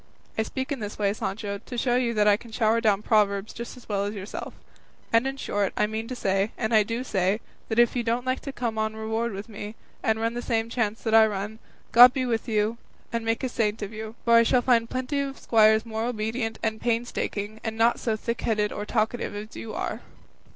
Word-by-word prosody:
I - - +1
speak 260 +5 -4
in 280 - -1
this 210 -1 -5
way, 200 -1 +1
Sancho, 200 -1 -4
to 245 - -8
show 245 +1 +2
you 240 -2 +1
that 210 0 +3
I 205 - +7
can 230 +2 -11
shower 225 0 +2
down 210 -2 +2
proverbs 205 -2 +2
just 235 +2 -7
as 250 - -15
well 200 -2 0
as 205 +1 -3
yourself; 200 +1 -6 0.6
and 230 +3 +4
in 270 0 -3
short, 205 -6 -1
I - - +3
mean 220 +1 -4
to 255 - -5
say, 195 -2 0
and 225 -1 -1
I 215 - +7
do 230 +4 -2
say, 195 -3 +1 0.3
that 220 - -1
if 240 +1 +5
you 245 - +1
don't 235 +2 -1
like 255 0 0
to 275 - -6
come 235 -4 -3
on 220 0 -1
reward 220 +2 -2
with 200 +1 -6
me, 210 -1 -7 0.3
and 220 0 +1
run 230 +1 0
the 240 - -3
same 230 -2 -1
chance 225 -3 -1
that 220 - -1
I 220 0 +8
run, 210 +1 -4 0.3
God 245 +2 +9
be 260 -1 -1
with 230 -1 -1
you 215 +1 +1 0.3
and 230 0 -1
make 225 +3 -1
a - - +1
saint 215 -2 -1
of 205 +2 -6
you; 220 +1 -7
for 235 - +4
I 230 - +8
shall 245 +2 +3
find 230 -2 +3
plenty 255 +3 -2
of 275 -1 -3
squires 220 -1 +4
more 225 0 -3
obedient 225 0 -2
and 220 -1 -1
painstaking, 225 -3 -2
and 220 -1 -3
not 230 +1 +3
so 225 -2 0
thickheaded 215 -2 -1
or 205 0 -5
talkative 220 -1 -1
as 210 +1 -7
you 225 - -6
are." - - -3
225 Hz, 235 wpm, -26 LUFS, 210-235 Hz, 0.6 s, God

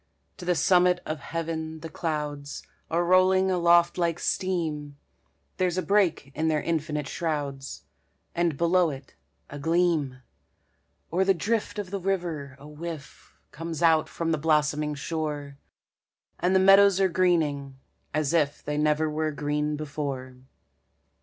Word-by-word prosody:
To 180 - -9
the 180 0 +2
summit 180 0 +4
of 155 0 -4
heaven 160 0 -4
the 165 - -6
clouds 150 -3 -4 0.3
Are 170 +1 +1
rolling 185 +1 +4
aloft 175 -1 +4
like 170 -1 +1
steam; 155 -8 -2 0.6
There's 180 -1 0
a 185 - 0
break 170 -6 +1
in 160 +3 -1
their 155 -1 +2
infinite 155 -3 -2
shrouds, 140 -4 -4 0.5
And 170 -4 0
below 170 +1 +3
it 135 -1 -9 0.4
a 145 - -7
gleam. 160 -5 +1 0.9
O'er 185 +2 +3
the 195 0 +3
drift 215 +5 -1
of 200 -3 -5
the 200 - -2
river 170 -8 -3
a 140 +2 -13
whiff 150 -1 -9
Comes 165 +1 -5
out 160 -2 +4
from 165 -1 -2
the 155 - 0
blossoming 150 -1 +1
shore; 145 -2 -4 0.8
And 180 +2 +2
the - - +6
meadows 195 0 +6
are 195 - +4
greening, 155 -7 0 0.3
as 155 0 0
if 150 -3 +1
They 150 0 -2
never 150 +1 +2
were 155 +1 -1
green 150 +1 -1
before. 140 -4 -5
160 Hz, 140 wpm, -26 LUFS, 150-175 Hz, 0.9 s, the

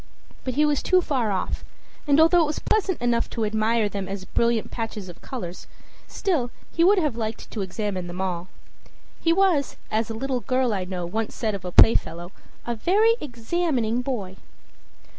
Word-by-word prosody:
But 255 -2 -3
he 300 - +4
was 295 -2 +1
too 370 - +4
far 260 - 0
off; 190 - -2 0.4
and 285 -1 +5
though 320 - +8 0.2
it - - +4
was 300 - -2
pleasant 395 -4 0
enough 235 -1 +1
to 225 -2 -2
admire 220 +1 +1
them 200 -2 -4
as 195 -1 -5
brilliant 235 +1 0
patches 215 -4 -5
of 175 - -12
color, 235 -10 -5 0.6
still 310 -11 -1 0.2
he 335 - +2
would 400 +4 +6
have 300 -9 +1
liked 225 -1 -5
to 215 - -3
examine 190 -1 -3
them 175 +1 -7
all. 180 -2 -2 0.7
He 330 - +3
was, 345 -6 +2 0.2
as 220 +1 0
a 225 - -4
little 260 +2 -1
girl 255 -1 +1
I 190 -2 -2
know 180 -1 -4
once 220 +5 -3
said 220 -3 -1
of 195 -2 -6
a 180 - -3
playfellow, 175 -4 +4 0.3
"a 240 - -1
very 405 - +3
examining 245 -2 -1
boy." 205 -8 -4
230 Hz, 180 wpm, -24 LUFS, 200-285 Hz, 0.7 s, though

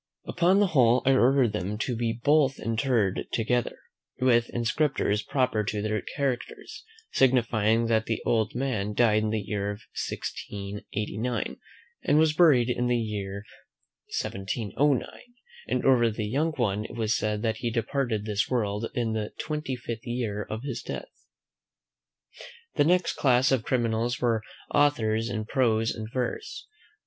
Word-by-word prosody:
Upon 180 +2 +3
the 205 - +5
whole, 125 -3 +4
I 135 - +5
ordered 130 -2 +4
them 105 0 -3
to 120 +3 -2
be 115 0 0
both 140 +4 +2
interred 115 -3 0
together, 120 +1 0 0.4
with 120 -2 +3
inscriptions 120 -3 0
proper 125 -2 0
to 105 0 -2
their 110 -1 -1
characters, 135 -3 -4 0.3
signifying, 115 -3 +3
that 110 -1 +1
the 115 - -1
old 110 -2 +1
man 110 -6 -2
died 110 -2 +4
in 110 - 0
the 110 - 0
year 100 0 -3 0.4
1689, 105 +3 -4 0.4
and 145 - +2
was 155 -1 +4
buried 145 -8 +5
in 125 0 0
the 120 0 +2
year 100 -3 -4 0.8
1709; 115 +7 0 0.6
and - - -1
over 120 -3 +5
the 110 0 -3
young 150 +9 0
one 105 -6 0
it - - -8
was 115 -1 0
said, 105 0 -1
that 110 -1 0
he 120 - -2
departed 115 -1 -1
this 105 -1 -1
world 110 -3 -1
in 115 -2 0
the 110 -1 -3
twenty 150 -4 -3
fifth 120 -1 -7
year 115 -4 -2
of 110 +3 -5
his 135 -4 -4
death. - - -8 1.5
The - - +3
next 180 +2 +2
class 130 -1 +3
of 130 -3 +3
criminals 120 0 0
were 115 -3 +1 0.3
authors 115 -6 +2
in 110 -3 -3
prose 115 -2 +1
and 110 0 -6
verse. 130 - -4
115 Hz, 145 wpm, -27 LUFS, 110-130 Hz, 1.5 s, the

